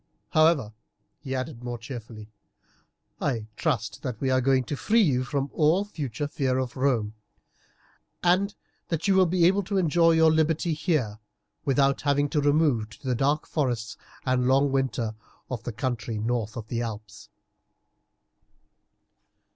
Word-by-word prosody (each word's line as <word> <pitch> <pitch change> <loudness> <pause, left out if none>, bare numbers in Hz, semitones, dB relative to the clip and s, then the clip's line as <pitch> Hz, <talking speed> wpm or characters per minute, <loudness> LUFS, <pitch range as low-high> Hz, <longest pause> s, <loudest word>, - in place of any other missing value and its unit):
However," 155 -9 +3 0.5
he 135 -3 -4
added 125 -2 -5
more 120 -1 -4
cheerfully, 115 -3 -9 0.9
"I 115 -6 -1
trust 125 -8 -2
that 125 -5 -4
we 135 -1 0
are 130 0 +3
going 130 0 +3
to 145 - -4
free 225 +10 +3
you 130 -7 +2
from 140 +2 -2
all 165 +6 +3
future 145 - -4
fear 135 -3 -1
of 130 -2 -3
Rome, 125 -6 0 1.1
and 185 +3 +2 0.3
that 165 +2 -2
you 195 - +4
will 190 -1 +5
be 175 0 +3
able 195 +3 +4
to 200 +1 -2
enjoy 165 -1 +4
your 160 0 +5
liberty 160 +1 +1
here 150 - -1 0.5
without 135 0 +2
having 145 0 +1
to 150 - +1
remove 145 -7 +2
to 135 - -10
the 125 - +2
dark 140 +5 +1
forests 120 -7 -2 0.3
and 130 -1 +1
long 135 +2 +3
winter 130 -4 -1 0.4
of 120 -4 -3
the 120 - -2
country 115 -1 -3
north 110 0 -2
of 110 -2 -6
the 120 0 -2
Alps." 110 -2 -7
135 Hz, 150 wpm, -26 LUFS, 120-155 Hz, 1.1 s, will